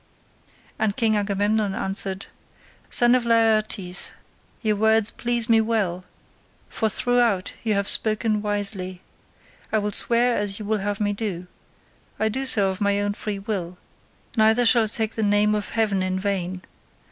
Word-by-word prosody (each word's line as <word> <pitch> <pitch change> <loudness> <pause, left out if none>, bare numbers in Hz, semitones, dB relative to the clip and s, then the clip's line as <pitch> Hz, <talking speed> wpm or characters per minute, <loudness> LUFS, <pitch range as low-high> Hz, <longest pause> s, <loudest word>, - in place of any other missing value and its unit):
And 210 -2 0
King 225 -3 +2
Agamemnon 205 0 0
answered, 195 0 -3 0.6
"Son 240 0 +5
of 255 -1 +2
Laertes, 215 -5 +1 0.5
your 215 -1 +1
words 220 0 +3
please 240 -1 -1
me 225 -2 +4
well, 200 -6 -1 0.6
for 220 - -1
throughout 235 -4 +1
you 220 -2 0
have 200 0 -1
spoken 215 -1 +1
wisely. 200 -3 0 0.7
I 220 - +2
will 210 0 -1
swear 240 +4 +2
as 205 -1 -1
you 215 - -7
would 215 0 0
have 205 0 -3
me 205 -1 0
do; 200 -4 -4 0.7
I 220 - +1
do 265 +5 -2
so 200 -6 +2
of 190 - -8
my 200 0 +1
own 205 0 -1
free 210 0 -5
will, 195 -3 -4 0.6
neither 220 +2 +4
shall 230 -1 +5
I - - -4
take 220 0 -2
the 220 - -3
name 205 0 +2
of 210 -1 -2
heaven 210 -4 0
in 185 0 -1
vain. 185 -2 -3
210 Hz, 160 wpm, -23 LUFS, 195-225 Hz, 0.7 s, Son